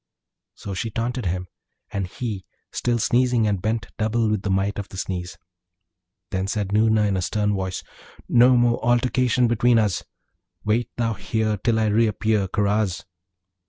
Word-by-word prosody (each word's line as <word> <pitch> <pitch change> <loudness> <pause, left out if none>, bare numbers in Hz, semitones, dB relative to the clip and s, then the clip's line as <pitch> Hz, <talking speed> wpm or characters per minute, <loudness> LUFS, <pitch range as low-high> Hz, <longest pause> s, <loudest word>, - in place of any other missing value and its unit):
So 100 - -7
she 105 +5 -3
taunted 120 0 -2
him, 90 +1 -2 0.4
and 100 -2 -2
he 105 -1 -5 0.3
still 120 -1 0
sneezing 120 0 +2
and 100 -3 0
bent 110 0 -1
double 110 +1 +1
with 105 -2 0
the 100 - -3
might 95 +2 0
of 100 - -6
the 95 - -9
sneeze. 90 -1 -4 0.9
Then 95 0 -1
said 100 -1 -2
Noorna 110 +1 +3
in 100 -2 +1
a - - -1
stern 105 +3 0
voice, 95 -2 -3 0.4
'No 125 +1 +6
more 120 -1 +2
altercation 125 0 +2
between 120 +1 +3
us! 105 -5 +1 0.6
Wait 110 +3 +1
thou 115 -2 0
here 110 0 -1
till 115 +3 +1
I 110 - +2
reappear, 110 -1 +2
Karaz!' 105 -1 0
110 Hz, 160 wpm, -23 LUFS, 100-120 Hz, 0.9 s, No